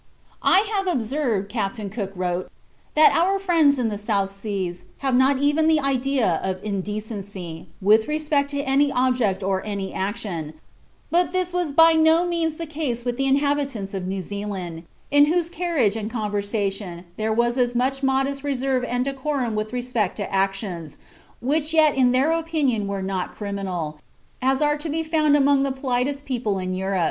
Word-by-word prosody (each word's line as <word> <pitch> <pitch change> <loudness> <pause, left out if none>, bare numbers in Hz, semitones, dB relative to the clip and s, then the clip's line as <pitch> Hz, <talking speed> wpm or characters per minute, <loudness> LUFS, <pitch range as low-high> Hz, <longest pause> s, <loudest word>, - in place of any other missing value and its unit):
"I 385 - +5
have 390 -2 0
observed," 240 - 0
Captain 205 0 -3
Cook 200 -3 -4
wrote, 180 0 -2 0.5
"that 310 0 +6
our 375 +4 +3
friends 330 -7 +3
in 240 -3 0
the 205 -1 -4
South 200 -2 0
Seas 195 -3 -4 0.2
have 265 - +2
not 260 +2 +4
even 290 +3 +2
the 320 -1 +4
idea 270 - +1
of 190 -1 -1
indecency, 200 -4 -5 0.2
with 215 +2 +5
respect 300 -2 0
to 285 -1 -2
any 280 +1 +2
object 250 -7 +1
or 190 0 0
any 200 -2 -4
action, 190 -6 -3 0.6
but 350 +1 +2
this 365 -1 -1
was 355 -4 0
by 325 +3 +6
no 320 +2 +4
means 335 -3 -1
the 330 - -5
case 290 -6 -3
with 245 -1 -1
the 270 0 0
inhabitants 275 -7 0
of 190 -2 -3
New 190 0 -3
Zealand, 190 -4 -5 0.3
in 290 0 +6
whose 340 +2 0
carriage 325 - +1
and 215 -1 -3
conversation 205 -4 -2
there 220 +2 -1
was 235 +2 +2
as 245 -1 +1
much 265 +3 0
modest 270 +1 0
reserve 265 -2 0
and 245 +1 -1
decorum 270 -3 -2
with 215 0 -2
respect 245 -5 -1
to 200 -2 -4
actions, 195 -5 -2 0.4
which 300 +5 0
yet 310 -2 +5
in 255 -2 +4
their 265 +5 +3
opinion 310 -10 0
were 200 -1 -3
not 190 -1 -3
criminal, 185 -7 -4 0.4
as 265 +3 +2
are 295 0 +2
to 310 +2 -5
be 320 +2 -1
found 310 -2 +3
among 280 -1 +4
the 275 0 +1
politest 265 +1 -1
people 230 -6 -1
in 185 0 -3
Europe. 190 +1 -1
245 Hz, 175 wpm, -23 LUFS, 200-290 Hz, 0.6 s, that